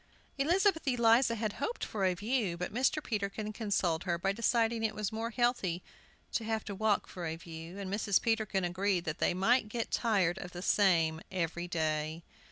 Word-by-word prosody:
Elizabeth 345 Hz, +2 st, +2 dB
Eliza 235 Hz, -1 st, +4 dB
had 215 Hz, -2 st, -2 dB
hoped 460 Hz, +11 st, -2 dB
for 205 Hz, -3 st, -3 dB
a 185 Hz, -1 st, +2 dB
view; 210 Hz, -3 st, -1 dB
but 180 Hz, +2 st, -4 dB
Mr. 265 Hz, +5 st, +1 dB
Peterkin 210 Hz, 0 st, -3 dB
con 220 Hz, -1 st, -5 dB
soled 175 Hz, -4 st, +1 dB
her 170 Hz, -2 st, 0 dB
by 195 Hz, +3 st, 0 dB
deciding 230 Hz, +1 st, +1 dB
it 215 Hz, -1 st, 0 dB
was 210 Hz, -2 st, -2 dB
more 225 Hz, +1 st, -3 dB
healthy 240 Hz, -8 st, 0 dB, 0.5 s
to 230 Hz, -, -1 dB
have 220 Hz, 0 st, -1 dB
to 205 Hz, -, -5 dB
walk 210 Hz, +1 st, +1 dB
for 175 Hz, -2 st, -6 dB
a 160 Hz, -, -3 dB
view, 165 Hz, +2 st, -9 dB
and 195 Hz, -1 st, -4 dB
Mrs. 205 Hz, -2 st, +2 dB
Peterkin 220 Hz, -4 st, 0 dB
agreed 180 Hz, +1 st, 0 dB
that 160 Hz, +1 st, -3 dB
they -, -, +2 dB
might 215 Hz, +4 st, +3 dB
get 230 Hz, +1 st, -3 dB
tired 195 Hz, -7 st, +2 dB
of 180 Hz, -, -8 dB
the 175 Hz, 0 st, -6 dB
same 165 Hz, -6 st, +3 dB
every 175 Hz, -1 st, -2 dB
day. 155 Hz, -1 st, -1 dB
200 Hz, 190 wpm, -32 LUFS, 175-230 Hz, 0.5 s, Eliza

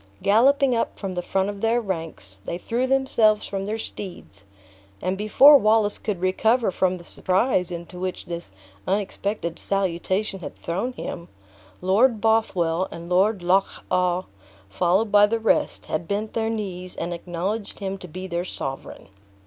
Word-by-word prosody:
Galloping 255 Hz, +5 st, +4 dB
up 230 Hz, -, -1 dB
from 195 Hz, -2 st, -4 dB
the 180 Hz, -, -2 dB
front 190 Hz, +2 st, 0 dB
of 200 Hz, -1 st, -5 dB
their 230 Hz, +2 st, +2 dB
ranks, 165 Hz, -, -5 dB
they 170 Hz, -, -3 dB
threw 240 Hz, +7 st, -1 dB
themselves 235 Hz, -5 st, +3 dB
from 195 Hz, 0 st, -4 dB
their 215 Hz, +2 st, -2 dB
steeds, 175 Hz, -, -7 dB, 0.5 s
and 185 Hz, +2 st, -1 dB
before 240 Hz, +9 st, +7 dB
Wallace 215 Hz, -2 st, +2 dB
could 200 Hz, -5 st, -3 dB
recover 220 Hz, +4 st, +2 dB
from 185 Hz, 0 st, +1 dB
the 175 Hz, -, -12 dB
surprise 185 Hz, +1 st, 0 dB
into 175 Hz, 0 st, -7 dB
which 185 Hz, 0 st, -4 dB
this 170 Hz, -, -6 dB, 0.4 s
unexpected 195 Hz, -2 st, -2 dB
salutation 195 Hz, +1 st, -1 dB
had 170 Hz, -, -8 dB
thrown 195 Hz, +10 st, -3 dB
him, 170 Hz, -7 st, -6 dB, 0.5 s
Lord 215 Hz, +5 st, +3 dB
Bothwell 190 Hz, -6 st, +1 dB
and 170 Hz, +1 st, -9 dB
Lord 190 Hz, +1 st, +3 dB
Loch 190 Hz, +2 st, +1 dB
awe, 180 Hz, 0 st, +2 dB, 0.5 s
followed 185 Hz, -, +1 dB
by 205 Hz, 0 st, +7 dB
the 230 Hz, +2 st, 0 dB
rest, 225 Hz, 0 st, +1 dB
had 165 Hz, +2 st, -3 dB
bent 210 Hz, +2 st, -2 dB
their 225 Hz, -1 st, 0 dB
knees, 185 Hz, -5 st, -5 dB
and 170 Hz, +1 st, -3 dB
acknowledged 180 Hz, +5 st, -4 dB
him 195 Hz, -1 st, -4 dB
to 180 Hz, -, -9 dB
be 185 Hz, +4 st, -7 dB
their 175 Hz, -1 st, -2 dB
sovereign. 135 Hz, -, -6 dB
195 Hz, 155 wpm, -24 LUFS, 175-220 Hz, 0.5 s, before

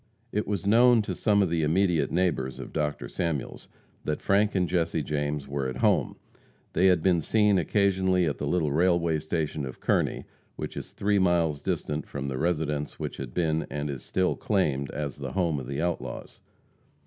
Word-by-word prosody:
It 105 Hz, -, -1 dB
was 100 Hz, -1 st, -2 dB
known 115 Hz, +2 st, +5 dB
to 100 Hz, -, -3 dB
some 100 Hz, +2 st, +2 dB
of 90 Hz, -, -1 dB
the 85 Hz, -1 st, +1 dB
immediate 85 Hz, +1 st, +2 dB
neighbors 85 Hz, -8 st, 0 dB
of -, -, -8 dB
Dr. 75 Hz, -5 st, -2 dB
Samuels 80 Hz, -3 st, -3 dB, 0.4 s
that 75 Hz, -, -2 dB
Frank 105 Hz, +1 st, +2 dB
and 90 Hz, -2 st, +2 dB
Jesse 85 Hz, -3 st, 0 dB
James 75 Hz, 0 st, -2 dB
were 70 Hz, -1 st, -2 dB
at 65 Hz, -, -4 dB
home. -, -, +2 dB, 0.6 s
They 95 Hz, -, +4 dB
had 90 Hz, -4 st, +3 dB
been 90 Hz, -3 st, +3 dB
seen 105 Hz, +2 st, +3 dB
occasionally 95 Hz, -1 st, +2 dB
at 75 Hz, -, -2 dB
the -, -, -2 dB
little 80 Hz, -5 st, +1 dB
railway 85 Hz, 0 st, +2 dB
station 80 Hz, -1 st, -2 dB
of 65 Hz, -1 st, -7 dB
Kearney, -, -, 0 dB, 0.3 s
which -, -, -6 dB
is -, -, -6 dB
three 100 Hz, 0 st, +1 dB
miles 85 Hz, -5 st, +2 dB
distant 75 Hz, +1 st, -2 dB
from 70 Hz, -1 st, -4 dB
the 65 Hz, -1 st, -3 dB
residence 75 Hz, -3 st, -1 dB
which -, -, -5 dB
had 65 Hz, -3 st, -7 dB
been, 80 Hz, -2 st, 0 dB
and 75 Hz, 0 st, -3 dB
was 65 Hz, -3 st, -6 dB
still 95 Hz, -1 st, 0 dB
claimed, 70 Hz, -10 st, 0 dB
as 75 Hz, -2 st, -4 dB
the -, -, -6 dB
home 85 Hz, -6 st, +1 dB
of 65 Hz, -, -7 dB
the 70 Hz, +4 st, -2 dB
outlaws. 70 Hz, -8 st, -4 dB
80 Hz, 185 wpm, -27 LUFS, 75-95 Hz, 0.6 s, known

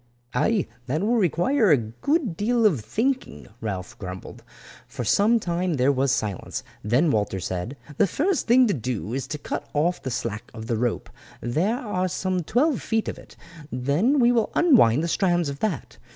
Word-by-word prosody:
"Aye, 205 Hz, -, +2 dB, 0.2 s
that 155 Hz, +6 st, -1 dB
will 235 Hz, +3 st, +2 dB
require 210 Hz, -, +2 dB
a 150 Hz, -, +6 dB
good 175 Hz, -, -1 dB
deal 230 Hz, +5 st, +1 dB
of 175 Hz, -, +4 dB
thinking," 255 Hz, -, -2 dB
Ralph 95 Hz, -5 st, -5 dB
grumbled. 95 Hz, +4 st, -8 dB, 0.4 s
For 125 Hz, +1 st, -5 dB
some 210 Hz, -, +3 dB
time 175 Hz, -3 st, -1 dB
there 130 Hz, +1 st, +3 dB
was 135 Hz, -1 st, +1 dB
silence; 105 Hz, -8 st, -2 dB, 0.2 s
then 125 Hz, -, +2 dB
Walter 105 Hz, -3 st, 0 dB
said, 95 Hz, +9 st, -4 dB, 0.2 s
"The 200 Hz, -, +4 dB
first 320 Hz, -, 0 dB
thing 250 Hz, +2 st, +6 dB
to 210 Hz, -, +1 dB
do 120 Hz, -4 st, -3 dB
is 135 Hz, +1 st, -3 dB
to 150 Hz, -, -4 dB
cut -, -, -5 dB
off 170 Hz, +5 st, +1 dB
the 130 Hz, -, -4 dB
slack 115 Hz, -3 st, -4 dB
of 110 Hz, -, -7 dB
the 115 Hz, -1 st, -1 dB
rope, 120 Hz, -1 st, -2 dB, 0.3 s
there 170 Hz, -, 0 dB
are 205 Hz, -6 st, -2 dB
some 185 Hz, 0 st, -1 dB
twelve 260 Hz, -, +1 dB
feet 225 Hz, -1 st, -1 dB
of -, -, -4 dB
it. -, -, -16 dB, 0.4 s
Then 145 Hz, -, +1 dB
we 245 Hz, -2 st, +5 dB
will 230 Hz, -3 st, +2 dB
unwind 165 Hz, -, +5 dB
the -, -, 0 dB
strands 175 Hz, -2 st, +1 dB
of 140 Hz, 0 st, -6 dB
that. 185 Hz, -, -3 dB
165 Hz, 180 wpm, -24 LUFS, -, 0.4 s, a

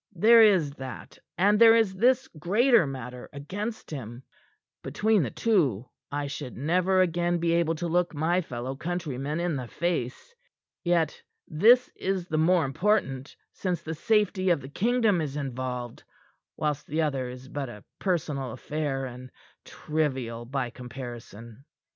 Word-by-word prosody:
There 225 Hz, +6 st, +7 dB
is 185 Hz, -9 st, +5 dB
that, 130 Hz, -1 st, -9 dB, 0.2 s
and 205 Hz, +4 st, +4 dB
there 225 Hz, 0 st, +9 dB
is 220 Hz, -4 st, +3 dB
this 250 Hz, +6 st, +3 dB
greater 205 Hz, -, +3 dB
matter 125 Hz, -2 st, -7 dB
against 205 Hz, +12 st, -6 dB
him. 120 Hz, -3 st, -7 dB, 0.6 s
Between 215 Hz, -2 st, +1 dB
the 130 Hz, -, -1 dB
two, 140 Hz, -, +1 dB, 0.2 s
I 145 Hz, 0 st, -2 dB
should 140 Hz, -2 st, -6 dB
never 180 Hz, +7 st, +2 dB
again 175 Hz, 0 st, +1 dB
be 170 Hz, 0 st, 0 dB
able 170 Hz, -1 st, +2 dB
to 170 Hz, +2 st, -3 dB
look 175 Hz, +1 st, +1 dB
my 170 Hz, +5 st, +1 dB
fellow 130 Hz, -3 st, -5 dB
countrymen 155 Hz, -2 st, -3 dB
in 175 Hz, -2 st, -1 dB
the 125 Hz, -2 st, -5 dB
face. 170 Hz, -, -3 dB, 0.5 s
Yet 170 Hz, -3 st, +1 dB, 0.3 s
this 235 Hz, +11 st, +5 dB
is 190 Hz, -2 st, -2 dB
the 155 Hz, -2 st, 0 dB
more 170 Hz, 0 st, +3 dB
important 135 Hz, -3 st, 0 dB, 0.2 s
since 180 Hz, -3 st, -3 dB
the 160 Hz, -, -4 dB
safety 195 Hz, +1 st, +1 dB
of 170 Hz, -4 st, +3 dB
the 135 Hz, -, -9 dB
kingdom 220 Hz, -, +2 dB
is 145 Hz, -2 st, -4 dB
involved; 125 Hz, -3 st, -4 dB, 0.6 s
whilst 150 Hz, -1 st, -2 dB
the 160 Hz, +2 st, 0 dB
other 135 Hz, -4 st, -1 dB
is 125 Hz, +1 st, -10 dB
but 140 Hz, -1 st, -4 dB
a 105 Hz, -4 st, -11 dB, 0.2 s
personal 150 Hz, -, -1 dB
affair, 145 Hz, -3 st, -3 dB
and 125 Hz, 0 st, -9 dB, 0.4 s
trivial 130 Hz, -7 st, -2 dB
by 125 Hz, -1 st, -3 dB
comparison. 120 Hz, -1 st, -9 dB
155 Hz, 150 wpm, -27 LUFS, 130-185 Hz, 0.6 s, there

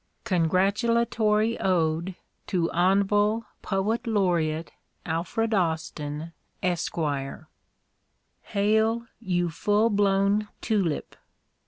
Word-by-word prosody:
CONGRATULATORY 215 Hz, +4 st, +2 dB
ODE 170 Hz, -1 st, 0 dB, 0.3 s
To 175 Hz, -4 st, 0 dB
Hon'ble 200 Hz, +5 st, +2 dB, 0.2 s
Poet 215 Hz, +5 st, -1 dB
Laureate 170 Hz, -7 st, 0 dB, 0.3 s
Alfred 175 Hz, +8 st, -1 dB
Austin, 160 Hz, -3 st, -2 dB, 0.3 s
Esq. 175 Hz, -2 st, -1 dB, 1.5 s
Hail! 220 Hz, +3 st, +1 dB
you 175 Hz, -5 st, -1 dB
full 210 Hz, +6 st, +2 dB
blown 200 Hz, +1 st, +2 dB
tulip! 195 Hz, -9 st, -1 dB
195 Hz, 70 wpm, -26 LUFS, 170-215 Hz, 1.5 s, CONGRATULATORY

